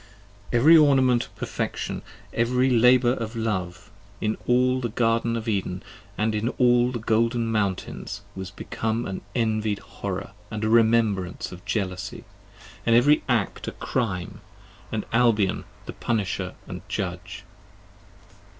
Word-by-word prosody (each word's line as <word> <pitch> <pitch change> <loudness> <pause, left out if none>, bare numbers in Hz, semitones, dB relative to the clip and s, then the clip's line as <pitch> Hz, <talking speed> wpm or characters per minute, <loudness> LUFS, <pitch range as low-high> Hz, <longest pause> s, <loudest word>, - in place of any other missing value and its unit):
EVERY 140 +8 +6
ornament 130 -5 +4
of - - -20
perfection, - - -3 0.3
and - - 0
every 125 +2 +2
labour 125 +1 +5
of 115 -2 -5
love, 105 -2 -3 0.3
In 110 0 0
all 125 +1 +3
the 120 - -2
Garden 115 +1 +1
of 115 0 -6
Eden, 95 -3 -2 0.2
& 100 +1 -26
in 110 +1 0
all 125 0 +4
the 125 - -3
golden 115 +1 +1
mountains, 100 -4 -2
Was 95 -1 -5
become 110 +3 -3
an 95 - -5
envied 110 -3 0
horror, 100 -1 -6 0.2
and 110 -1 -4
a 110 - +1
remembrance 110 -5 +2
of 90 0 -10
jealousy: 95 -3 -3 0.6
And 115 - +3
every 145 +6 +5
Act 115 -5 0
a - - -3
Crime, 95 -8 -3 0.5
and 110 -2 -2
Albion 115 -5 +2 0.2
the - - -7
punisher 100 -4 -2 0.2
& - - -9
judge. - - -4
115 Hz, 135 wpm, -25 LUFS, 100-120 Hz, 0.6 s, EVERY